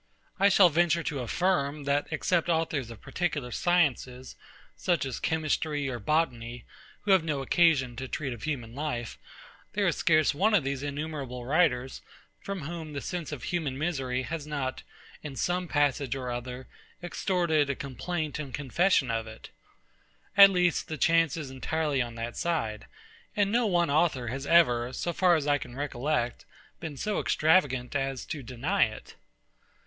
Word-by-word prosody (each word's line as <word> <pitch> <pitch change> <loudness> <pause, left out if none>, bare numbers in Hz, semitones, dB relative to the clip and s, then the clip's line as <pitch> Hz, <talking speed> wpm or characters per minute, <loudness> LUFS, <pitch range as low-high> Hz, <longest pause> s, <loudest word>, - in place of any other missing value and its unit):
I 200 +1 +6
shall 190 -2 +6
venture 170 +1 +2
to 145 -4 -3
affirm, 150 +2 0
that, 140 +1 0
except 175 -1 0
authors 160 -7 0
of 115 -3 -11
particular 150 -8 -2
sciences, 130 -6 0 0.4
such 175 -5 0
as 130 - -4
chemistry 155 -2 -1
or 120 -2 -4
botany, 120 -7 -1 0.4
who 205 - 0
have 190 -4 +5
no 145 -4 -2
occasion 140 -5 +3
to 130 0 -4
treat 135 -1 -3
of 115 - -10
human 120 -5 -4
life, 125 -5 -4 0.5
there 205 -1 +1
is 170 - +2
scarce 155 -2 +3
one 205 +9 +3
of 185 - +3
those 135 0 -2
innumerable 140 -4 -5
writers, 130 -3 +1 0.4
from 195 -2 -5
whom 160 0 -6
the 140 - -3
sense 175 -4 -4
of 145 -5 -6
human 155 -7 -2
misery 135 -5 -1
has 150 +3 -5
not, 135 -3 -3 0.4
in 145 -3 -7
some 180 +5 -1
passage 145 -3 +1
or 125 -2 -4
other, 125 +1 -6 0.4
extorted 170 -5 +1
a 140 - 0
complaint 150 +5 -4
and 140 -4 -5
confession 145 -1 +2
of 115 -1 -2
it. 110 0 -11 0.8
At 200 -1 +10
least, 180 -2 +1
the 155 - -4
chance 165 -2 +3
is 145 -5 -6
entirely 145 +1 -1
on 120 -1 -4
that 115 +1 -5
side; 150 -11 -2 0.5
and 205 -1 +2
no 235 0 +2
one 175 -5 +2
author 145 -6 +2
has 135 +3 -5
ever, 125 -8 +4
so 175 +6 -2
far 180 0 +4
as 155 -3 -1
I 145 -1 +2
can 120 - -9
recollect, 135 -2 -2 0.4
been 160 -4 -6
so 210 +8 -1
extravagant 145 -6 +2
as 135 -2 -2
to 155 -3 -5
deny 135 +11 +1
it. 110 0 -9
145 Hz, 165 wpm, -28 LUFS, 130-170 Hz, 0.8 s, At